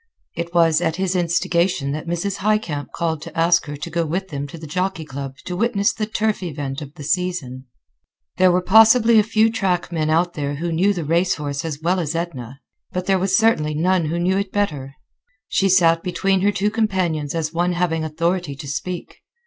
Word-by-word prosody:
It 170 0 -4
was 165 -2 +3
at 165 -2 0
his 190 0 -1
instigation 170 -3 +1
that 155 +3 -5
Mrs. 175 +4 -2
Highcamp 195 -8 -1
called 160 -3 -2
to - - -10
ask 170 0 +3
her 145 0 -6
to 150 - -6
go 170 +1 0
with 185 +5 -3
them 145 -1 -4
to 155 - -10
the 160 - -9
Jockey 180 +1 -2
Club 135 -1 -6
to 180 - -4
witness 205 0 +1
the 215 -1 -3
turf 220 -1 -1
event 145 -5 -4
of 145 0 -9
the 150 - -9
season. 155 -6 -2 0.7
There 185 -1 +5
were 180 +1 +1
possibly 225 +3 +6
a - - +4
few 220 +1 +2
track 185 -5 -1
men 155 -2 -1
out 170 +2 +2
there 145 -1 -3
who 170 +4 -3
knew 180 +5 +2
the 175 -6 -3
race 175 +4 +2
horse 145 -2 -4
as 155 -2 -5
well 180 +2 +1
as 165 -2 -2
Edna, 135 -7 -5 0.3
but 180 0 -3
there 190 0 +2
was 190 +1 +2
certainly 155 -10 +2
none 175 +2 +2
who 160 +3 -2
knew 185 +3 +1
it 200 -1 -3
better. 145 -10 -2 0.5
She 195 - +1
sat 165 -3 +4
between 190 +1 0
her 205 +2 +3
two 205 +1 0
companions 185 -9 -1
as 160 -1 -2
one 175 +1 +1
having 170 -2 0
authority 165 0 -1
to 140 - -9
speak. 175 +5 -5
170 Hz, 205 wpm, -21 LUFS, 155-190 Hz, 0.7 s, possibly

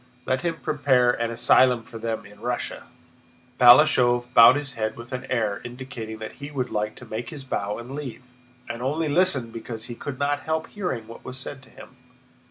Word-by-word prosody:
Let 130 0 0
him 170 -1 -1
prepare 130 -4 +3
an 115 -1 -2
asylum 120 +1 +4
for 115 -1 -10
them 115 -1 -3
in 105 0 -15
Russia!" 120 +2 -3 0.7
Balashëv 125 -1 +6
bowed 115 +3 +9
his 145 -2 -3
head 110 -1 -3
with 120 +2 -10
an 125 - -5
air 110 -5 0
indicating 120 -3 -7
that 110 0 -7
he 140 - -6
would 130 -4 -3
like 105 0 -2
to 130 - -12
make 115 +2 -5
his 145 -4 -8
bow 105 -5 -3
and 120 +3 -8
leave, 135 -3 -6 0.4
and 120 0 -6
only 155 +5 -1
listened 145 -8 +1
because 115 -1 -6
he 120 - -7
could 130 +3 -6
not 145 +1 0
help 160 +1 -3
hearing 175 - -4
what 115 - -11
was 130 - -7
said 135 +1 -5
to 130 - -18
him. 130 - -14
125 Hz, 195 wpm, -24 LUFS, 115-135 Hz, 0.7 s, bowed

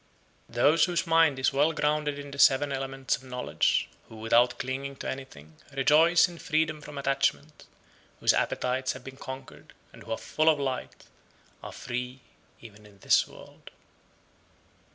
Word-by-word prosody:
89. 120 +1 0
Those 165 - +4
whose 175 -1 -1
mind 165 -4 +4
is 130 +1 +1
well 145 +4 +2
grounded 150 -1 0
in 145 0 -8
the 140 - -9
(seven) 140 +1 +5
elements 135 0 -2
of - - -13
knowledge, 125 -1 0 0.2
who - - -12
without 120 +2 +2
clinging 135 +2 -4
to - - -7
anything, 80 - -8 0.2
rejoice 160 +6 +5
in 170 -1 -11
freedom 155 -2 -1
from 150 -1 -10
attachment, 140 +2 -1 0.5
whose - - +4
appetites 130 +1 -1
have - - -11
been 130 0 -10
conquered, 130 0 -10 0.2
and - - -14
who - - -10
are 115 - -1
full 155 +1 +1
of 155 -2 +2
light, 135 -2 -4 0.6
are - - -8
free 125 +1 -6 0.4
(even) 105 -2 -14
in 100 -1 -20
this - - +3
world. - - -15
135 Hz, 160 wpm, -28 LUFS, 125-150 Hz, 0.6 s, seven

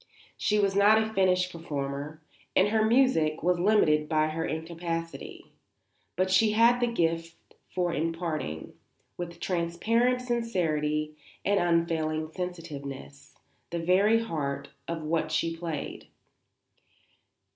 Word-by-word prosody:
She 210 - +1
was 200 -2 +2
not 205 +2 +6
a 220 0 -2
finished 185 -2 +2
performer 150 -1 -5 0.3
and 195 +2 +5
her 220 0 +2
music 220 - +3
was 180 0 +2
limited 160 -6 +3
by 155 -1 +2
her 160 +1 -3
incapacity; 165 +1 -5 0.6
but 185 +1 +1
she 210 +3 +4
had 235 +3 +5
the 245 - +2
gift 165 -4 -1 0.3
for 175 -2 -1
imparting, 160 - -3 0.4
with 170 -1 -6
transparent 220 +10 +1
sincerity 155 -11 -1 0.3
and 200 0 +3
unfailing 160 -2 0
sensitiveness, 145 - -7 0.3
the 170 - -3
very 195 +7 +3
heart 140 -8 -3 0.2
of 165 -1 -4
what 155 0 -1
she 165 +1 0
played. 165 -3 -5
170 Hz, 115 wpm, -28 LUFS, 155-200 Hz, 0.6 s, not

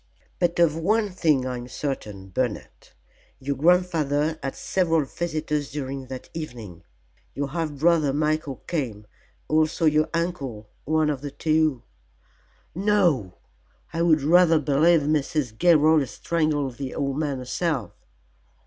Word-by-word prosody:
But 175 -1 +1
of 170 -3 +4
one 205 +5 +1
thing 155 -7 +1
I 125 -1 -3
am 120 0 -8
certain, 105 -8 -5
Bernard: 115 +2 -4 0.5
your 140 +1 -2
grandfather 160 -1 +2
had 135 - -4
several 165 -5 +1
visitors 150 -2 -3
during 135 -2 -5
that 130 0 -8
evening. 120 - -7 0.5
Your 140 0 -2
half 160 0 -3
brother 155 0 +2
Michael 150 -2 -1
came, 120 -11 -3 0.4
also 155 +2 +1
your 155 0 +3
uncle. 140 -11 -3
One 155 0 +2
of 135 -3 -4
the 145 - -5
two 155 -3 +1 0.5
" - - -36 0.2
"No! 175 - +1 0.6
I 165 - -1
would 160 -4 +3
rather 165 +1 +5
believe 155 +3 +3
Mrs. 145 -4 -1
Gilroy 155 0 +4
strangled 145 -4 -1
the 135 -2 -5
old 140 0 -2
man 145 -3 -1
herself." 130 - -2
150 Hz, 130 wpm, -24 LUFS, 135-165 Hz, 0.6 s, rather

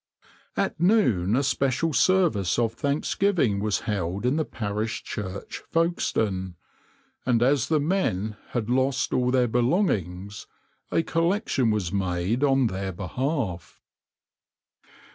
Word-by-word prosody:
"\par - - +2
At - - -8
noon 125 - +3
a 135 - +2
special 135 +4 0
service 155 - +2
of 115 -2 +1
thanksgiving 140 - +1
was 105 0 0
held 100 0 -2
in 125 +3 +2
the 160 - +1
parish 105 0 -3
church, 100 -2 -6
Folkestone, 110 - 0 0.7
and 120 -2 +2
as 135 -1 +2
the 155 -2 +2
men 140 - 0 0.2
bad 115 -3 -1
lost 130 +2 +1
all 125 -1 +2
their 125 -1 +3
belongings, 105 - 0 0.4
a 165 - +1
collection 165 - +1
was 105 -4 -1
made 95 +5 0
on 135 -2 +3
their 95 -3 -2
behalf. 100 - -3
120 Hz, 125 wpm, -25 LUFS, 100-145 Hz, 0.7 s, noon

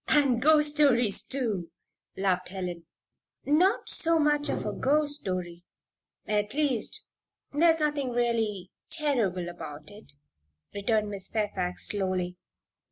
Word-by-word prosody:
"And 270 -5 +4
ghost 300 +1 +5
stories, 250 -8 +3
too," 220 -10 -2 0.5
laughed 185 -2 0
Helen. 180 -3 -5 0.6
"Not 355 +8 +2
so 330 0 +3
much 295 -1 +2
of - - -2
a - - -2
ghost 290 +1 +1
story 175 -2 -5 0.6
at 210 +1 -1
least, 280 -7 -1 0.5
there's 325 +2 +4
nothing 295 -3 0
really 225 -6 -1 0.2
terrible 245 - 0
about 160 -3 -8
it," 205 -8 -14 0.6
returned 210 0 0
Miss 195 -1 -2
Fairfax, 195 -5 -1
slowly. 185 -3 -2
220 Hz, 115 wpm, -28 LUFS, 185-290 Hz, 0.6 s, ghost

